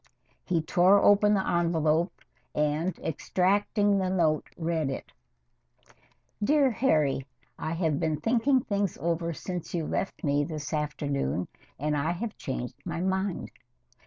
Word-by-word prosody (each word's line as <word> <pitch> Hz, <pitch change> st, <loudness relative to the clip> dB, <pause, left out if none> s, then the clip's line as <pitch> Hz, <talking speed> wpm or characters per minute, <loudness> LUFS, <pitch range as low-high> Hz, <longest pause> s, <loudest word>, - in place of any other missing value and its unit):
He 170 Hz, -4 st, 0 dB
tore 180 Hz, +5 st, +5 dB
open 205 Hz, +1 st, +5 dB
the 190 Hz, -, 0 dB
envelope 170 Hz, 0 st, +1 dB, 0.3 s
and, 150 Hz, +4 st, 0 dB
extracting 200 Hz, +5 st, +1 dB
the 185 Hz, -1 st, 0 dB
note, 165 Hz, -5 st, +1 dB
read 160 Hz, -3 st, -1 dB
it: 135 Hz, -, -6 dB, 1.3 s
Dear 280 Hz, +2 st, +4 dB
Harry 150 Hz, -, +1 dB, 0.3 s
I 160 Hz, -, -2 dB
have 160 Hz, -4 st, 0 dB
been 155 Hz, -2 st, 0 dB
thinking 245 Hz, -, +2 dB
things 200 Hz, -3 st, -1 dB
over 170 Hz, 0 st, -1 dB
since 175 Hz, +2 st, -5 dB
you 165 Hz, -2 st, -1 dB
left 195 Hz, -, -3 dB
me 145 Hz, -1 st, +2 dB
this 155 Hz, +1 st, -5 dB
afternoon 145 Hz, -, -1 dB, 0.3 s
and 150 Hz, +2 st, -1 dB
I 150 Hz, +4 st, 0 dB
have 215 Hz, +5 st, -4 dB
changed 125 Hz, -2 st, -4 dB
my 170 Hz, -1 st, -4 dB
mind. 190 Hz, +1 st, -1 dB
170 Hz, 130 wpm, -28 LUFS, 150-195 Hz, 1.3 s, tore